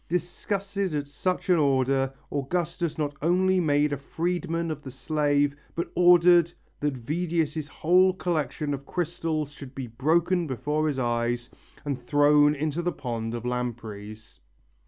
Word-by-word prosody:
Disgusted 195 +1 -2
at 145 -1 -1
such 180 +8 -2
an 175 - +5
order, 135 -1 +2 0.2
Augustus 170 +3 -2
not 145 -2 -2
only 185 +3 +3
made 145 -3 +2
a - - -1
freedman 165 +2 -2
of 150 -1 -5
the 135 - -8
slave 145 +1 +1 0.2
but 170 - -3
ordered 175 -1 +6 0.3
that 145 -3 -1
Vedius' 155 +2 -1
whole 180 +4 +4
collection 155 -5 -2
of 140 0 -6
crystals 160 -4 -2
should 140 -2 -11
be 135 - -4
broken 165 +8 +1
before 150 +4 -1
his 145 -3 -1
eyes 120 -1 -1 0.3
and 140 -3 -3
thrown 145 +2 +4
into 155 +3 -2
the 175 +1 0
pond 115 -4 -4
of 120 0 -6
lampreys. 110 -3 -5
150 Hz, 140 wpm, -26 LUFS, 135-170 Hz, 0.3 s, ordered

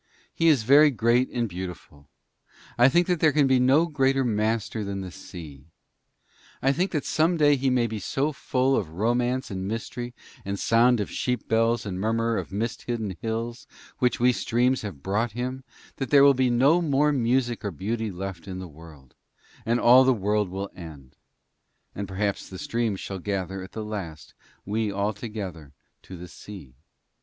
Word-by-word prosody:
He 165 - +1
is 145 -8 +4
very 145 +6 +7
great 120 0 +2
and 120 -1 -1
beautiful. 90 -6 -8 0.7
I 120 +2 +6
think 175 +5 +3
that 180 -2 0
there 155 -1 +4
can 145 -1 +3
be 130 -1 +3
no 135 +6 +4
greater 135 -4 +1
master 110 -1 -1
than 100 -1 -4
the 95 -1 -7
sea. 80 -7 -11 0.9
I 135 - +2
think 180 +6 0
that 150 -5 -2
some 165 +2 +2
day 145 -2 +5
he 135 0 0
may 125 -2 +2
be 110 -2 -4
so 135 +9 -1
full 135 -1 0
of 95 -10 -1
romance 120 +8 -1
and 95 0 -4
mystery 120 +3 -5 0.3
and 100 0 -4
sound 120 +1 +4
of 105 - -3
sheep 125 -1 -2
bells 115 0 +1
and 95 -2 -4
murmur 115 +2 0
of - - -5
mist 110 +4 -3
hidden 110 -6 -3
hills, 115 +2 -4 0.3
which 125 -1 +1
we 125 +1 +5
streams 125 +2 +1
shall 105 - -5
have 75 -9 -11
brought 105 +3 -1
him, 130 +2 -4 0.3
that 135 - -3
there 140 -1 +6
will 140 0 +7
be 130 -1 +1
no 135 +8 +4
more 150 -2 +2
music 120 -2 0
or 100 - -1
beauty 110 +6 -3
left 95 -1 -7
in 95 -1 -5
the 95 -1 -7
world, 75 -4 -15 0.5
and 120 +1 +2
all 125 +2 +7
the 130 -1 +3
world 105 -1 0
will 95 +2 -5
end; 75 -7 -11 0.8
and 100 0 -5
perhaps 100 +2 -2
the 95 - -8
streams 115 -1 -2
shall 95 -1 -6
gather 95 0 -3
at 95 - -10
the 110 -1 -5
last, 85 - -7 0.3
we 105 +1 -1
all 100 +2 -1
together, 95 - -7 0.3
to 95 - -10
the 90 +1 -9
sea. 90 -6 -11
115 Hz, 185 wpm, -25 LUFS, 95-130 Hz, 0.9 s, very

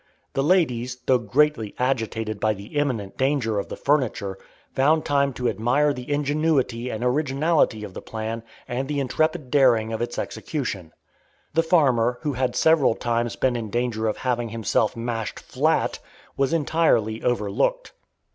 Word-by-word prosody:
The 135 - +1
ladies, 130 -7 +1
though 130 -1 +4
greatly 120 0 +1
agitated 115 -4 -1
by 110 0 +1
the 100 +7 -11
imminent 125 -10 -1
danger 130 -6 +1
of - - -4
the - - -5
furniture, 120 -9 0 0.3
found 155 +4 +3
time 140 -1 +2
to 125 0 -2
admire 140 +7 +2
the 125 +1 -7
ingenuity 145 -4 0
and 110 0 -4
originality 135 -2 +1
of 100 -3 -8
the - - -7
plan 110 +1 -5 0.3
and 130 +2 -3
the 145 0 -1
intrepid 155 +1 -1
daring 120 -6 +4
of 110 - -3
its 120 0 -3
execution. 105 - -4 0.6
The 165 - +4
farmer, 130 -8 +3
who 150 -2 -1
had 125 -1 -1
several 160 -7 +4
times 120 0 -1
been 130 -2 +1
in 115 -3 -4
danger 115 0 -1
of 110 - -1
having 120 -2 -1
himself 110 0 0
mashed 115 -3 -3
flat, - - 0 0.4
was 135 -1 +1
entirely 150 -9 +1
overlooked. 105 -5 0
125 Hz, 155 wpm, -24 LUFS, 115-145 Hz, 0.6 s, though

